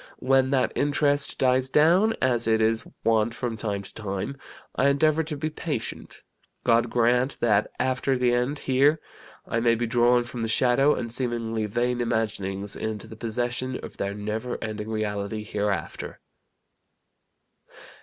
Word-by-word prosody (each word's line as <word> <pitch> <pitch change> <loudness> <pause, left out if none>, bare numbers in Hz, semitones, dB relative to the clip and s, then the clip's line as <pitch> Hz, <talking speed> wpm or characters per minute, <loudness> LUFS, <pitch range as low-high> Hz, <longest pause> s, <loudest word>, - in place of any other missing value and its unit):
When 130 0 +2
that 135 -2 +1
interest 145 0 +2
dies 130 0 +2
down, 175 +10 +4
as 120 -3 +2
it 110 0 +3
is 110 +1 +1 0.2
wont 115 0 +2
from 120 -3 -3
time 105 -3 -3
to - - -12
time, 100 +3 -4 0.4
I 135 - +2
endeavor 155 +3 +3
to 150 -1 -4
be 155 +2 -3
patient. 150 -7 -5 0.4
God 115 0 +3
grant 125 +3 +1
that, 105 -3 +2
after 130 +1 0
the 125 -1 +2
end 125 +4 0
here, 140 +4 +2 0.5
I 115 - 0
may 115 0 +3
be 120 +1 -1
drawn 120 +1 +3
from 120 0 -7
the 115 - -1
shadow, 130 +5 +3
and 115 - -4
seemingly 115 -3 -1
vain 120 +3 -1
imaginings 100 -4 -2
into 110 -2 -4
the 110 - -11
possession 120 +3 -3
of - - -12
their 100 0 -3
never 110 +4 -3
ending 110 0 -5
reality 105 -1 -3
hereafter." 105 -5 -3
120 Hz, 150 wpm, -25 LUFS, 110-130 Hz, 0.5 s, down